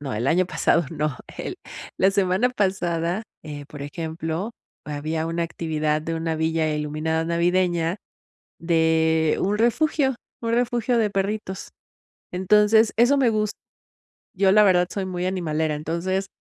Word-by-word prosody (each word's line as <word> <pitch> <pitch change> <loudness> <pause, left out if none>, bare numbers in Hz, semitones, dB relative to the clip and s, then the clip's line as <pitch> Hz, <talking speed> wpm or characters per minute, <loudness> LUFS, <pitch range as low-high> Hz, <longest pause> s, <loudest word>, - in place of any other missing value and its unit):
no, 140 -3 -5
el 115 +4 -2
año 175 +6 +3
pasado 170 -2 +2
no, 150 -3 -2 0.2
el - - -4 0.4
la 190 - +4
semana 195 +4 +2
pasada, 185 -3 -1 0.2
eh, 145 -1 -7
por 145 -2 -8
ejemplo, 160 +5 -4 0.3
había 155 +2 -3
una 165 +1 -1
actividad 155 -2 -1
de 165 +1 -3
una 165 0 -2
villa 160 -1 0
iluminada 155 +2 -1
navideña, 175 +1 +1 0.6
de 160 -1 +2
un 205 +2 +1
refugio 265 +3 +2 0.3
un 230 0 -1
refugio 240 0 +1
de 215 -2 +2
perritos. 195 -1 -3 0.6
Entonces, 210 +4 +4
eso 245 +5 +5
me 255 -4 +3
gust 215 -1 -1 0.8
Yo 190 0 +4
la 210 +2 +6
verdad, 180 -3 +4
soy 195 -2 -3
muy 180 -1 -3
animalera. 160 -4 -1
Entonces, 170 +6 -2
175 Hz, 140 wpm, -23 LUFS, 160-200 Hz, 0.8 s, la